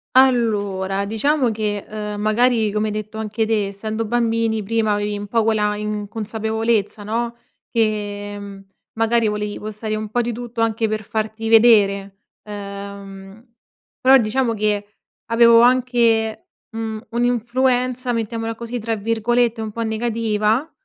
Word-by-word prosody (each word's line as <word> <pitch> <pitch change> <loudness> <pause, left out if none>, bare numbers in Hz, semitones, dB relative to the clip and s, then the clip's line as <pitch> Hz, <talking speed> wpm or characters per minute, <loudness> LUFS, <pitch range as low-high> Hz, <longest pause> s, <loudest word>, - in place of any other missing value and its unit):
Allora 205 -7 +2
diciamo 250 +5 +1
che, 210 -2 -2
ehm, 210 -1 -5
magari 220 0 +2
come 215 +1 0
hai 210 - -4
detto 215 +1 -5
anche 220 0 -2
te, 210 -3 +1
essendo 215 +3 -4
bambini 230 -1 0
prima 220 +1 0
avevi 205 0 -1
un 205 - -5
poco 225 +1 +1
la 210 -1 +1
inconsapevolezza, 215 +1 -2
no, 230 +3 -2 0.3
che, 205 -2 -1
mhmm, 200 -1 -9 0.4
magari 225 0 +3
volevi 210 0 -2
postare 215 0 -4
un 215 -1 -4
po' 245 +2 +2
di 240 0 -2
tutto 240 0 -5
anche 225 0 +1
per 215 0 -2
farti 220 +1 -3
vedere. 200 -4 +4 0.3
Uhm, 200 0 -9 0.6
però 265 +1 +7
diciamo 235 +2 0
che 210 -1 -2 0.3
avevo 230 0 +7
anche, 235 -3 +2 0.2
mhmm, 220 -1 -5
un'influenza, 245 +1 0
mettiamola 225 0 -2
così, 235 +2 -5
tra 225 0 -2
virgolette, 230 +2 +1
"un 220 -1 -4
po' 230 - -5
negativa", 225 +3 0
220 Hz, 135 wpm, -20 LUFS, 210-230 Hz, 0.6 s, però